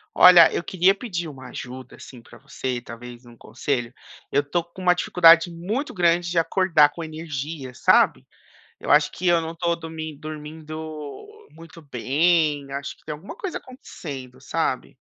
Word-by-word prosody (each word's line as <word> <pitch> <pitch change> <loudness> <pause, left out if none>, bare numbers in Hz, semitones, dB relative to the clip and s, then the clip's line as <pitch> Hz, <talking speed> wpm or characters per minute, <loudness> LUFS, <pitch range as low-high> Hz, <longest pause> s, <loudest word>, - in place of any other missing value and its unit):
Olha, 180 -2 +8
eu - - -2
queria 185 +1 +3
pedir 195 -5 -5
uma 135 -4 -10
ajuda, 130 0 -9
assim, 125 -3 -13
pra 115 - -16
você, 125 +2 -4
talvez 120 +1 -11
um 120 -1 -15
conselho, 120 -1 -3 0.4
eu 145 +1 +2
tô 165 +4 -1
com 170 +2 -16
uma 180 0 +5
dificuldade 170 -1 +5
muito 205 - -4
grande 175 -4 +2
de 175 - -3
acordar 165 -3 +4
com 165 +3 -8
energia, 155 -3 -6
sabe? - - +3 0.5
Eu - - -7
acho 150 0 +5
que 185 - -4
eu 175 -1 +5
não 165 0 -5
tô 170 0 0
domin 160 -2 -7
dormindo 155 0 -8 0.8
muito 165 +1 -14
bem, 145 +1 +1
acho 140 0 -5
que - - -29
tem - - -4
alguma 175 - -10
coisa 385 -2 -5
acontecendo, 140 - -10
sabe? 60 +2 -2
160 Hz, 165 wpm, -23 LUFS, 140-175 Hz, 0.8 s, Olha